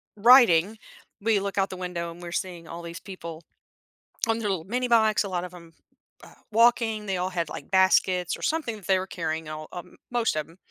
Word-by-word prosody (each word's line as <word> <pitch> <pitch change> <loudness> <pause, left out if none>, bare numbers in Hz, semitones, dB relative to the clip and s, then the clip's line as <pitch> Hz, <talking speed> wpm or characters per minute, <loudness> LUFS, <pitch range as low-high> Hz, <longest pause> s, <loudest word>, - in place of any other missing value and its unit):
riding, 215 -4 +6 0.4
we 220 -1 +2
look 200 0 -4
out 195 - +1
the 185 - -7
window 180 -2 -4
and 170 +1 -12
we're 170 - -7
seeing 175 -2 -4
all 170 - -7
these 170 0 -7
people 170 -4 -9 0.8
on 225 0 +1
their 210 - -2
little 180 -5 -2
minibikes. 230 -1 +2
A 200 - -5
lot 180 -1 -2
of 180 - -10
'em, 170 -2 -13 0.5
uh, - - -15 0.2
walking, 225 -1 +3
they 195 - -1
all 180 +1 -1
had, 170 -3 -2
like, - - -8
baskets 185 -1 +3
or - - -15
something 310 -8 -1
that 200 - -13
they 190 -1 +3
were 190 - -5
carrying, 160 -3 -4
all 155 0 -7
uh 175 - -6 0.3
most 240 -7 +1
of 155 0 -3
'em, 165 - -18
185 Hz, 215 wpm, -26 LUFS, 170-215 Hz, 0.8 s, riding